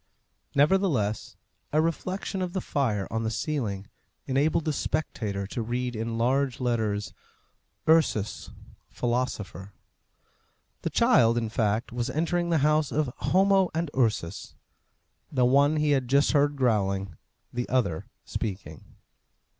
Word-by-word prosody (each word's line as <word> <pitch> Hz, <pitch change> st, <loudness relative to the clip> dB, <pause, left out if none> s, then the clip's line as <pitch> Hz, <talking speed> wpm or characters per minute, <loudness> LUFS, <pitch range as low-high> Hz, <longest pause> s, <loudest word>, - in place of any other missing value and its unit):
Nevertheless, 145 Hz, -, +1 dB, 0.3 s
a 155 Hz, -, +3 dB
reflection 185 Hz, +4 st, -2 dB
of 180 Hz, -1 st, -3 dB
the 190 Hz, -, 0 dB
fire 115 Hz, -, -1 dB
on 115 Hz, -, -1 dB
the 110 Hz, -, -1 dB
ceiling 110 Hz, -6 st, -3 dB, 0.4 s
enabled 145 Hz, +4 st, +1 dB
the 155 Hz, -, 0 dB
spectator 105 Hz, -10 st, -2 dB
to 110 Hz, +4 st, -4 dB
read 120 Hz, +2 st, -2 dB
in 115 Hz, +1 st, -3 dB
large 130 Hz, +3 st, +1 dB
letters, 105 Hz, -6 st, -1 dB, 0.7 s
URSUS, 155 Hz, -10 st, +2 dB, 0.4 s
PHILOSOPHER. 110 Hz, -6 st, -3 dB, 1.1 s
The -, -, -2 dB
child, 115 Hz, +1 st, +4 dB
in 115 Hz, -2 st, -1 dB
fact, 110 Hz, +1 st, 0 dB
was 120 Hz, +1 st, -2 dB
entering 170 Hz, +5 st, 0 dB
the 165 Hz, -, +3 dB
house 150 Hz, -1 st, +2 dB
of 145 Hz, -4 st, 0 dB
Homo 195 Hz, 0 st, +3 dB
and 165 Hz, -2 st, -1 dB
Ursus. 105 Hz, -8 st, -1 dB, 0.8 s
The 130 Hz, -3 st, +2 dB
one 140 Hz, +4 st, +4 dB
he 150 Hz, -1 st, +2 dB
had 135 Hz, -3 st, +1 dB
just 140 Hz, +3 st, +3 dB
heard 145 Hz, 0 st, +3 dB
growling, 100 Hz, -, 0 dB, 0.4 s
the 125 Hz, 0 st, -3 dB
other 115 Hz, -11 st, 0 dB, 0.2 s
speaking. 95 Hz, -7 st, -5 dB
125 Hz, 125 wpm, -27 LUFS, 110-150 Hz, 1.1 s, child